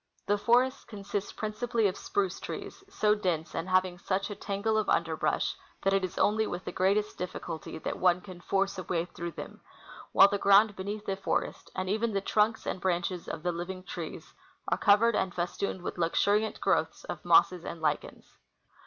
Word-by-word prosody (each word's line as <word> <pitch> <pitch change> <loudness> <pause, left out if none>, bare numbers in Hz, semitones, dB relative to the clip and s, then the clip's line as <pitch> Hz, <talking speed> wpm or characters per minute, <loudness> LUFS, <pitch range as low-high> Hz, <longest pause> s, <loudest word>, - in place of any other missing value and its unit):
The 205 0 +1
forests 245 +5 +3
con 205 -3 -10
sist 200 0 -3
principally 225 +1 -1
of 190 - +2
spruce 195 -2 -1
trees, - - -7
so 215 - +2
dense 180 -6 -1
and 180 - -3
having 185 -1 +2
such 195 +2 -1
a - - -4
tangle 200 +2 -1
of 215 -1 +1
underbrush 165 -2 +1 0.3
that 195 - +3
it 195 -1 +2
is 185 - -4
only 215 +1 +2
with 175 +1 -5
the - - -3
greatest 200 +3 +1
difficulty 170 -3 -5
that 160 - -4
one 180 -1 +4
can 180 -2 -11
force 195 +1 0
a - - -4
way 170 0 -1
through 170 -1 -6
them; - - -9 0.5
while 195 - +8
the 200 0 -1
ground 200 +1 +5
Ijeneath 205 +3 -5
the 195 - -2
• - - -19
forest, - - -2
and 185 0 -2
even 220 +3 0
the 200 - +2
trunks 215 +2 +1
and 185 - -3
branches 175 -1 -1
of 160 - -5
the 180 - +1
living 180 +2 -5
trees, 190 - -7 0.3
are - - +1
covered 210 +2 +5
and 185 - -1
festooned 180 +1 -2
with 180 - -5
luxuriant 205 +6 +2
growths - - 0
of - - -6
mosses 180 -2 +4
and 170 - -6
lichens. 155 -2 -2
195 Hz, 195 wpm, -29 LUFS, 180-210 Hz, 0.5 s, while